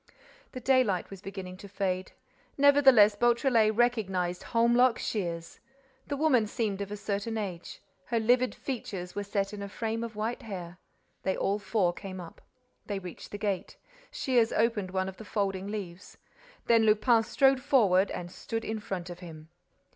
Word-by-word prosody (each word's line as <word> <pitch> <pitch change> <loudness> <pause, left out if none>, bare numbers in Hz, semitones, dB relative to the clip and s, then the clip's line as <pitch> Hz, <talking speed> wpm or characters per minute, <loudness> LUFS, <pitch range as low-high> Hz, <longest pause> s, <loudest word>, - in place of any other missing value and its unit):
The 255 - -5
daylight 250 -9 +2
was 195 -2 -9
beginning 190 -2 -7
to 200 - -11
fade. 190 -1 -2 0.4
Nevertheless, 270 -7 +6
Beautrelet 235 -1 +3
recognized 190 -7 +1
Holmlock 235 +1 +3
Shears. 170 -5 -4 0.5
The 285 - -2
woman 270 -8 +3
seemed 205 -3 -2
of 200 0 -5
a 210 - -4
certain 205 +2 -3
age. 185 -5 -6 0.2
Her 230 +3 0
livid 245 +3 +2
features 195 -9 -5
were 205 - -3
set 200 0 -2
in 205 - -6
a 200 - -5
frame 225 +2 -3
of 230 -2 -6
white 220 +3 -3
hair. 180 -4 -7 0.4
They 190 - -1
all 200 +2 0
four 200 -4 +1
came 190 +1 -8
up. 170 -2 -10 0.5
They 205 - -2
reached 180 -2 -9
the 205 - -6
gate. 205 -3 -3 0.3
Shears 255 - +1
opened 220 -4 +1
one 190 0 -1
of 190 - -7
the - - -9
folding 195 -2 -2
leaves. 195 -4 -7 0.5
Then 230 -1 +5
Lupin 220 +2 +4
strode 270 +3 +3
forward 210 -9 +4
and 175 0 -6
stood 225 +4 -5
in 220 0 -3
front 180 -4 -5
of 175 - -9
him. 160 -3 -11
205 Hz, 165 wpm, -29 LUFS, 190-235 Hz, 0.5 s, Nevertheless